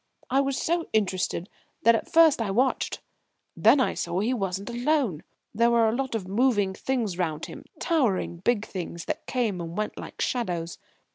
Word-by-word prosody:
I 270 +2 +4
was 275 -1 -1
so 340 0 0
interested 185 -4 0 0.4
that 230 +2 +7
at 225 - -2
first 320 -6 +6
I 220 - -1
watched. 250 +7 0 0.5
Then 285 - +5
I 260 - +2
saw 170 +1 -2
he 225 +6 +1
wasn't 195 -1 -3
alone. 245 - 0 0.3
There 235 +2 +3
were 235 -1 +4
a 220 - +1
lot 265 -2 -2
of 195 -5 -3
moving 205 -2 +2
things 220 -5 -2
round 160 -3 -1
him, - - -10
towering 240 - +1
big 215 +4 0
things, 170 -2 -6
that - - -4
came 225 -8 -1
and 170 0 -6
went 215 0 -3
like - - -9
shadows. 175 -9 -2
220 Hz, 180 wpm, -26 LUFS, 185-255 Hz, 0.5 s, that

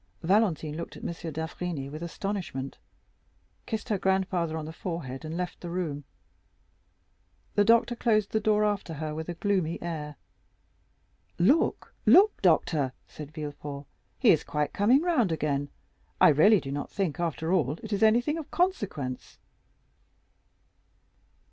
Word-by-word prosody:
Valentine 170 -5 +2
looked 170 +1 -6
at - - -12
M. - - -2 0.2
d'Avrigny 160 -2 -4
with 155 +3 -8
astonishment, 170 -6 -4 0.9
kissed 220 -1 -4
her 205 -3 +1
grandfather 185 -4 0
on 155 - -5
the 160 - -7
forehead, 160 -7 -5
and 160 +1 -5
left 180 0 -4
the 175 - -6
room. 160 -5 -3 1.5
The 205 - +4
doctor 230 +2 +4
closed 215 -4 +1
the 220 - +2
door 210 0 +2
after 200 -5 -2
her 155 +1 -4
with 160 +2 -5
a 175 - -3
gloomy 180 -3 0
air. 155 -3 -5 1.2
"Look, 260 - +2
look, 410 +3 +6
doctor," 155 -6 +2
said 150 -1 -10
Villefort, 145 -2 -6 0.3
"he - - +5
is - - +3
quite 150 -1 -2
coming 245 +9 +4
round 265 - +2
again; 145 -2 -1 0.5
I - - +8
really 190 +8 +6
do 135 - -6
not 145 +1 -4
think, 185 -7 -2
after 165 0 -1
all, 150 -7 +2
it 220 -1 -4
is 200 - -1
anything 240 +8 +3
of 310 - -8
consequence." 200 - -2
170 Hz, 140 wpm, -28 LUFS, 150-205 Hz, 1.5 s, I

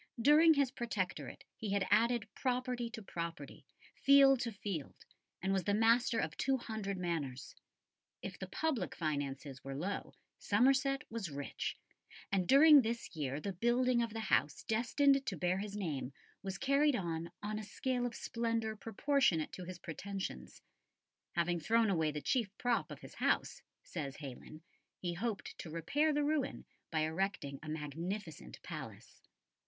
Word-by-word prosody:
During 305 +6 +7
his 280 -3 +2
Protectorate 225 -8 -3
he 215 - -5
had 200 -1 +2
added 230 +1 +3
property 250 -2 -1
to 225 -1 -8
property, 170 -6 -6 0.3
field 275 -1 +6
to 235 -1 -2
field, 195 -8 -5 0.5
and 190 +1 +1
was 190 -3 0
the 205 - +2
master 230 +2 +4
of - - -1
two 270 -1 +2
hundred 220 -5 -4
manors. 160 -8 -3 0.7
If - - -6
the - - -5
public 270 - -1
finances 140 -4 -3
were 135 0 -5
low, 185 +8 -4 0.2
Somerset 275 +1 +3
was 225 -6 -3
rich, 145 -1 -4 0.5
and 190 -3 +1
during 290 +1 +9
this 230 -5 -4
year 145 -2 -2
the 195 +5 -4
building 240 +5 +2
of 230 -1 -1
the 225 +1 -4
house 150 -8 +1
destined 275 +5 +3
to 190 - -2
bear 180 +4 +1
his 205 0 -5
name 145 -9 -3 0.3
was 195 -1 -4
carried 275 +2 +3
on 170 -4 -2
on 215 +1 -2
a - - -5
scale 245 +3 -1
of 235 - -7
splendour 230 -1 -1
proportionate 225 - +1
to 180 - -7
his 185 0 -7
pretensions. 175 - -6 0.7
Having 170 0 +1
thrown 225 +5 +3
away 160 -4 +2
the 150 0 -4
chief 235 - +1
prop 245 -2 +1
of - - -9
his - - -11
house, - - 0 0.2
says 140 -5 -5
Heylyn, 145 +2 -9 0.4
he 175 -1 -3
hoped 210 +3 -3
to 170 - -6
repair 280 - +1
the 295 0 +1
ruin 295 -2 -1 0.2
by 160 -2 0
erecting 160 -4 -1
a 155 - -8
magnificent 160 - -5
palace. - - -8
205 Hz, 155 wpm, -35 LUFS, 165-245 Hz, 0.7 s, during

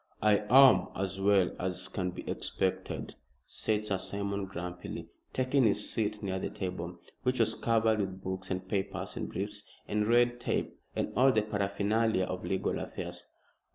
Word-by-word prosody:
"I 105 -1 +6
am 135 +1 +8
as 95 0 -2
well 100 -2 +4
as 90 0 -2
can 95 -1 -2
be 90 - -8
expected," - - -2 0.3
said 105 -1 -1
Sir 100 -3 0
Simon, 100 0 -2
grumpily, 90 -1 -6 0.2
taking 130 +1 +2
his 105 -1 +1
seat 105 -1 -1
near 95 -1 -1
the - - -2
table, 90 -2 -4 0.2
which 125 -1 0
was 110 -1 +3
covered 110 -1 +2
with 95 -1 -3
books, 95 0 -4
and 95 0 -3
papers, 100 +1 -2
and - - -3
briefs, - - -3 0.3
and 105 0 +1
red 120 +1 +4
tape, - - -1 0.2
and - - -1
all 130 +2 +6
the 110 -4 +2
paraphernalia 105 +1 +1
of 90 0 -4
legal 95 - -1
affairs. - - -5
100 Hz, 160 wpm, -31 LUFS, 95-110 Hz, 0.3 s, am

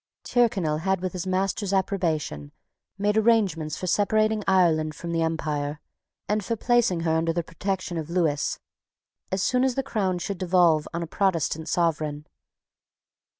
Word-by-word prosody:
Tyrconnel 195 -11 +1
had, 190 +2 0
with 185 -1 -3
his 185 0 -4
master's 195 +2 -1
approbation, 165 - -1 0.5
made 205 +1 +1
arrangements 195 -9 +2
for - - -5
separating 215 +3 +2
Ireland 160 -5 +3
from 170 +2 -6
the 165 -1 0
empire, 150 -2 -2 0.5
and 210 0 0
for 230 - -1
placing 230 -7 +2
her 165 -1 0
under 165 +1 +1
the 170 0 -1
protection 185 +1 -3
of 160 -1 -4
Lewis, 165 -5 0 0.7
as 190 0 0
soon 250 0 +2
as 260 -2 +1
the 270 - 0
crown 195 -8 -1
should 175 +2 -4
devolve 175 -4 +3
on 170 0 -3
a - - -3
Protestant 165 -3 0
sovereign. 155 -4 0
180 Hz, 150 wpm, -25 LUFS, 160-200 Hz, 0.7 s, Ireland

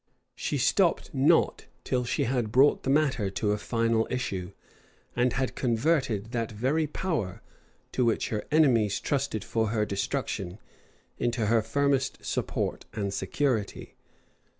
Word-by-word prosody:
She - - -2
stopped - - +2
not - - +3 0.2
till 125 -1 0
she 140 +4 0
had 120 -4 -1
brought 135 +5 +5
the - - -3
matter 135 -8 +2
to 105 +2 -1
a 105 - +1
final 115 +1 +1
issue; 95 -8 -3 0.6
and 125 0 +2
had 130 0 -1
converted 120 -3 0
that 115 -2 -2
very 135 +9 0
power, 125 - -3 0.5
to 125 - +1
which 115 -2 +1
her 105 -2 -2
enemies 120 -10 +3
trusted 140 -7 -1
for 110 -1 0
her 105 -1 0
destruction, 100 -2 -3 0.6
into 120 -2 0
her 115 +1 +3
firmest 135 +4 0
support - - -2
and 100 -3 -2
security. 110 +2 -2
115 Hz, 135 wpm, -28 LUFS, 105-135 Hz, 0.6 s, brought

